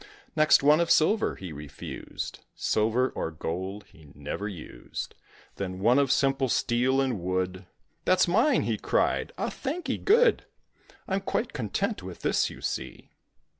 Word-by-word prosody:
Next 155 -2 +5
one 150 +2 +6
of 170 -1 +1
silver 210 +8 +3
he 90 -4 -8
refused; 70 -1 -7 0.2
Silver 115 +4 +1
or - - -3
gold 95 +6 -5
he 80 -2 -17
never 75 +8 -4
used. 90 -7 -7 0.4
Then 95 -2 -4
one 120 +8 +4
of 140 -2 +2
simple 135 -1 +2
steel 125 +2 +2
and 130 -6 0
wood; 90 +1 -2 0.4
"That's 185 - +4
mine!" 225 - +3
he - - -1
cried. - - +1
"Ah! - - -2
thankee 305 +6 -3
good; 465 +3 +4 0.6
I'm 195 +1 0
quite 225 +4 -2
content 170 - -2
with 90 -2 -9
this, - - +1
you - - -11
see." - - -5
125 Hz, 145 wpm, -27 LUFS, -, 0.6 s, one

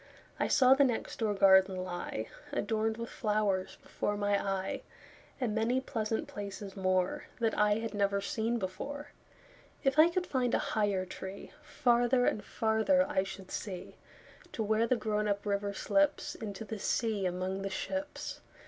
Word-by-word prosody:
I - - +2
saw 260 -2 +6
the 275 +1 +5
next 245 -4 -1
door 215 -3 +1
garden 190 -1 +6
lie, 175 -11 -4 0.2
Adorned 220 +1 0
with 230 0 -5
flowers, 210 -3 0
before 205 - -2
my 205 -1 +1
eye, 195 -1 -2 0.6
And 245 -5 0
many 225 +4 +2
pleasant 225 -4 -2
places 200 -1 -6
moreThat 185 +4 0
I 210 0 +3
had 225 0 -3
never 200 -1 +1
seen 225 +4 -1
before. 275 +9 -5 0.7
If 270 +1 +2
I 325 +2 +8
could 360 +1 -1
find 255 -6 +1
a - - -1
higher 205 -3 +1
treeFarther 245 +5 0
and 210 - 0
farther 225 +6 +2
I 190 - +1
should 195 0 -8
see, 190 -4 -6 0.6
To 225 - -1
where 220 +2 +2
the 255 - +3
grown 210 -2 -1
up 200 0 -1
river 200 0 0
slipsInto 220 -5 0
the 220 0 -5
sea 215 -3 0
among 185 +2 -2
the 195 - -2
ships. 285 +9 -4
215 Hz, 150 wpm, -32 LUFS, 195-240 Hz, 0.7 s, I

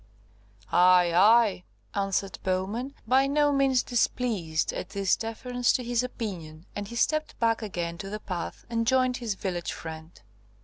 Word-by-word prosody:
"Aye, 180 -1 +5
aye," 205 +1 +5 0.3
answered 195 -1 -1
Bowman, 200 +9 -2
by 265 +3 +4
no 290 +1 +3
means 270 -2 +3
displeased 220 -10 0
at 180 - -5
this 195 -1 +1
deference 245 +2 -1
to 250 - -1
his 240 0 0
opinion, 180 -10 -6
and 205 -1 -4
he 235 - -8
stepped 310 +6 0
back 230 -1 +2
again 170 -5 -4
to 195 - -6
the 210 +1 -5
path, 180 -5 -6
and 230 -1 -1
joined 255 -1 +3
his 225 -5 -3
village 180 -3 -3
friend. 160 0 -9
215 Hz, 150 wpm, -27 LUFS, 180-245 Hz, 0.3 s, Aye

